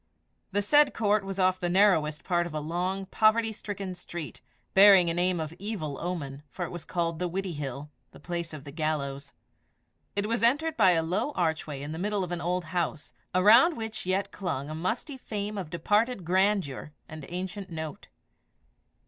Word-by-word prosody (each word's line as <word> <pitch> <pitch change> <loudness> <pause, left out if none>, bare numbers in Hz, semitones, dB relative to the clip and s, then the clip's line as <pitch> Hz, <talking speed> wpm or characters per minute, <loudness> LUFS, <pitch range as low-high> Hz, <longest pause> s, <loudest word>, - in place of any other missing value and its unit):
The 205 +1 +1
said 290 +6 +5
court 210 -2 +2
was 195 0 -5
off 185 -1 +2
the 175 - -1
narrowest 175 -6 +3
part 175 -1 +1
of 155 - -8
a - - 0
long, 180 +5 -2
poverty 220 +3 +3
stricken 200 -3 -5
street, 175 -3 -7 0.3
bearing 190 -3 +7
a - - -1
name 175 0 +1
of 160 0 -4
evil 185 -9 -4
omen, 145 -6 -4
for 175 +7 -4
it - - -8
was 175 -2 -7
called 170 -2 -2
the 180 - -1
Widdiehill 150 -7 -4 0.2
the - - -15
place 170 +1 -4
of 155 -3 -8
the 140 - -9
gallows. 140 -3 -3 0.8
It 200 0 0
was 230 +2 -1
entered 290 +7 +2
by 190 -5 +5
a 165 -1 +2
low 185 - -1
archway 160 - -1
in 145 - -5
the 160 - -5
middle 205 +1 0
of 180 - -5
an 175 -1 -3
old 180 +1 -1
house, 170 -3 -2 0.2
around 225 - +6
which 220 -4 -5
yet 190 +1 0
clung 155 -7 -4
a - - -4
musty 225 - -3
fame 210 -4 -4
of 190 -6 -5
departed 205 +5 +1
grandeur 185 -6 +1
and 155 -1 -9
ancient 185 +2 -5
note. 160 -2 -6
180 Hz, 180 wpm, -28 LUFS, 160-205 Hz, 0.8 s, bearing